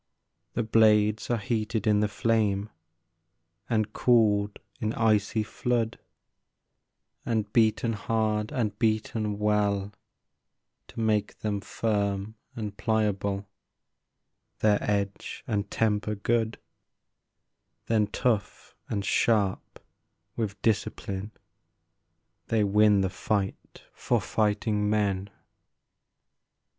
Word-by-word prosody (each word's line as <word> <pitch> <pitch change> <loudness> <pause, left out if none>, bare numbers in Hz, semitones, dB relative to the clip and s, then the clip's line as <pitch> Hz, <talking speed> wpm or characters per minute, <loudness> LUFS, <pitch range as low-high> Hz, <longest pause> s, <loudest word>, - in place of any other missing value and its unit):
The 120 - 0
blades 110 -1 +3
are 120 - +2
heated 110 +1 -2
in 105 -1 +4
the 105 - +2
flame, 105 -1 0 1.0
And 110 -2 0
cooled 105 -4 +3 0.2
in 110 +1 -1
icy 110 -1 +2
flood, 115 +1 -1 1.2
And 110 -3 -1
beaten 115 0 +3
hard, 110 +1 -1
and 105 -5 -2
beaten 110 -1 0
well, 105 -1 +1 0.9
To - - -10
make 105 -2 0
them 105 -2 -1
firm 100 -1 -1 0.2
and 105 -3 -5
pliable, 100 -3 0 1.1
Their 105 -1 +3
edge 100 -1 -2
and 100 -2 -2
temper 105 -1 0
good; 110 +2 0 1.3
Then 110 -2 +2
tough 110 -1 -1 0.2
and 100 -2 -2
sharp 105 -2 +1 0.6
with 105 -4 -3
discipline, 100 -2 -1 1.2
They 110 -2 +2
win 105 0 +4
the 95 - +1
fight 100 0 -3
for - - 0
fighting 105 -1 0
men. 100 -2 0
105 Hz, 95 wpm, -27 LUFS, 100-110 Hz, 1.3 s, in